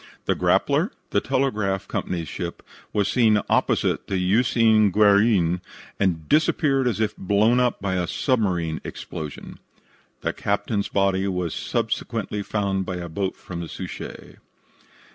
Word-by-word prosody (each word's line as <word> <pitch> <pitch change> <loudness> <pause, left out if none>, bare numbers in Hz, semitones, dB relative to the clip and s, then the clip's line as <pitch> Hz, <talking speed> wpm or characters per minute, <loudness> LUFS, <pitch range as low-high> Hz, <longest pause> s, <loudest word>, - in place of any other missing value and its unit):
The - - +2
Grappler, - - +2 0.2
the - - +2
telegraph 105 -8 0
company's 85 -3 -3
ship, 85 -3 -6 0.3
was 105 -2 +1
seen 110 -4 +4
opposite - - +1
the 100 - -2
Usine 110 +2 +4
Guerin, 100 -3 +4 0.4
and 85 -5 0
disappeared 145 -3 +2
as 110 -4 0
if 110 -1 0
blown 105 +5 +3
up 125 -1 +1
by 100 -1 -2
a 90 -1 -1
submarine 90 - 0
explosion. 80 -5 -7 0.6
The - - -1
captain's 100 0 -1
body 100 -1 +1
was 90 -4 -2
subsequently 105 - -2
found 100 -2 -1
by 90 0 -4
a 85 -1 -5
boat 95 +3 -2
from 85 -2 -8
the 85 -2 -6
Suchet. - - -8
100 Hz, 135 wpm, -24 LUFS, 90-110 Hz, 0.6 s, seen